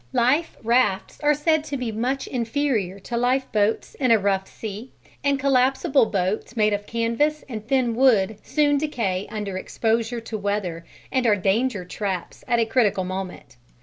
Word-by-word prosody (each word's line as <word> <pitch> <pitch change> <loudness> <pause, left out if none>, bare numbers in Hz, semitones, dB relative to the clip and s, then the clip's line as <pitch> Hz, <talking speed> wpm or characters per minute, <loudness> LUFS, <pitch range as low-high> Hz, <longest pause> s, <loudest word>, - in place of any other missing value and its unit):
Life 260 +7 +2
rafts 230 -4 +1
are 295 0 +4
said 315 +1 +2
to 280 -2 -3
be 245 -3 -3
much 255 +5 -1
inferior 230 -6 -1
to 235 - -5
lifeboats 240 -3 +1
in 255 -3 0
a 230 - +7
rough 195 -1 0
sea, 220 +3 -7 0.3
and 280 -1 +2
collapsible 270 -1 +3
boats 200 +5 -2
made 210 -1 +3
of 205 0 -3
canvas 235 +7 0
and 220 -4 -7
thin 255 -3 +2
wood 220 -5 +3
soon 290 -2 +2
decay 220 -11 -2
under 205 -3 -4
exposure 225 +4 -1
to 225 -1 -6
weather 200 -5 -2 0.3
and 255 -2 +1
are 210 - +5
danger 205 +1 0
traps 190 -1 -4
at 235 - +2
a 230 - +3
critical 220 -5 +2
moment. 185 -7 -6
230 Hz, 160 wpm, -23 LUFS, 205-260 Hz, 0.3 s, a